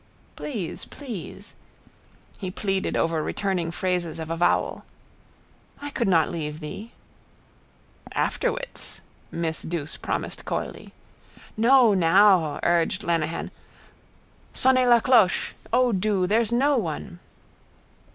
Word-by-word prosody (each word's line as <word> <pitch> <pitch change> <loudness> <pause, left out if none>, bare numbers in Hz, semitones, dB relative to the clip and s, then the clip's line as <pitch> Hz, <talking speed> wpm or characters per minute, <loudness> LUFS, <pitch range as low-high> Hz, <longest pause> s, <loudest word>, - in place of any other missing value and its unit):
—Please, 215 - -5
please. 240 - -9 0.9
He 190 - -4
pleaded 195 0 -1
over 165 -1 +1
returning 180 0 -1
phrases 180 -1 -2
of 160 0 -5
avowal. 165 +1 +1 1.0
—I 290 0 -6
could 235 -5 -1
not 165 -4 +3
leave 155 -3 -4
thee... 200 +9 -8 1.2
—Afterwits, - - -2 0.3
miss 165 -1 -2
Douce 160 -3 -4
promised - - -4
coyly. - - -5 0.6
—No, 235 0 +5
now, 185 -2 +4
urged 170 +2 +1
Lenehan. 165 -1 -1 1.0
Sonnez 255 -1 +4
la 240 -1 +6
cloche! 225 -8 +3 0.2
O 250 +1 +3
do! 195 -1 +1
There's 225 +4 +1
no 275 +4 +3
one. 175 0 -5
190 Hz, 100 wpm, -25 LUFS, 165-235 Hz, 1.2 s, la